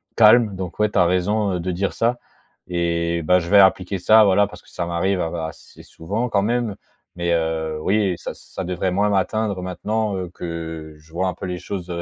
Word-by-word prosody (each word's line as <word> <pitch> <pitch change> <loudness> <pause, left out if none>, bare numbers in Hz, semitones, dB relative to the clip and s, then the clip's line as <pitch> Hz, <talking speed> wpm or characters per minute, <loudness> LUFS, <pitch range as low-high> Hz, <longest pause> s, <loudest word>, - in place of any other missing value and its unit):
calme. 110 -2 +6
Donc 95 -1 -6
ouais, 105 0 +2
tu 100 - +1
as 90 - +5
raison, 95 +3 +1
heu, 90 - -1
de 90 +2 -2
dire 95 +3 -1
ça 120 +2 +1 0.5
et 85 -1 0
bah, 90 +4 +4
je 85 -1 -6
vais 100 - +6
appliquer 95 0 +3
ça, 110 +5 +6
voilà, 100 0 +4
parce - - -12
que - - -22
ça 90 - -4
m'arrive 85 +3 0
av 80 - -2
assez 80 -2 -7
souvent, 105 +9 -4
quand 100 -3 +1
même, 115 -1 0 0.4
mais 85 -1 -1
heu, 80 -1 -1
oui, 100 +2 +1
ça - - -6
ça 95 - -8
devrait 90 +1 -2
moins 100 +3 +2
m'atteindre 105 0 0
maintenant, 105 +3 -2
heu, 90 -2 -4
que 80 -3 -6
je 80 +1 -22
vois 95 +2 0
un - - -3
peu - - -7
les 90 0 -3
choses 90 0 -6
95 Hz, 215 wpm, -22 LUFS, 85-105 Hz, 0.5 s, calme